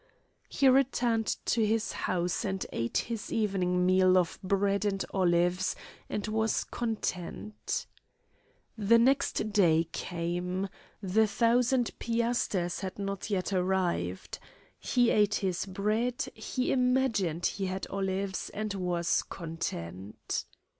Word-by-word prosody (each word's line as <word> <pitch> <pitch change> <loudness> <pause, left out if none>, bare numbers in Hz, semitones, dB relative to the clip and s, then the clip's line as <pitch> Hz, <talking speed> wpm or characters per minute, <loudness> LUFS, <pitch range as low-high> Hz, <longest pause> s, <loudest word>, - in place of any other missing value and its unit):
He 275 - +3
returned 245 -4 +3 0.2
to 225 - +2
his 220 +1 +1
house 175 +2 -1
and 190 -3 -2
ate 115 0 -1
his 230 -2 -3
evening 185 -4 +1
meal 185 0 +5
of 175 -3 0
bread 200 +1 +1
and 195 -2 0
olives, 180 0 +2 0.3
and 210 - -3
was 220 +1 +1
content. 170 - -3 0.9
The 220 +2 +4
next 255 -3 +2
day 165 -5 +4
came. 180 +2 -3 0.3
The 215 +4 +3
thousand 240 +3 +2
piasters 230 -6 0
had 190 -2 -5
not 200 +1 -4
yet 195 -1 -1
arrived. 180 - -1 0.4
He 245 -2 +2
ate 210 0 +3
his 190 -1 -1
bread, 215 +6 0
he 250 +3 -2
imagined 250 -10 +1
he 195 -1 -1
had 190 +1 -3
olives, 195 0 -2
and 215 -1 -2
was 175 -3 0
content. 100 - -5
195 Hz, 115 wpm, -30 LUFS, 180-225 Hz, 0.9 s, meal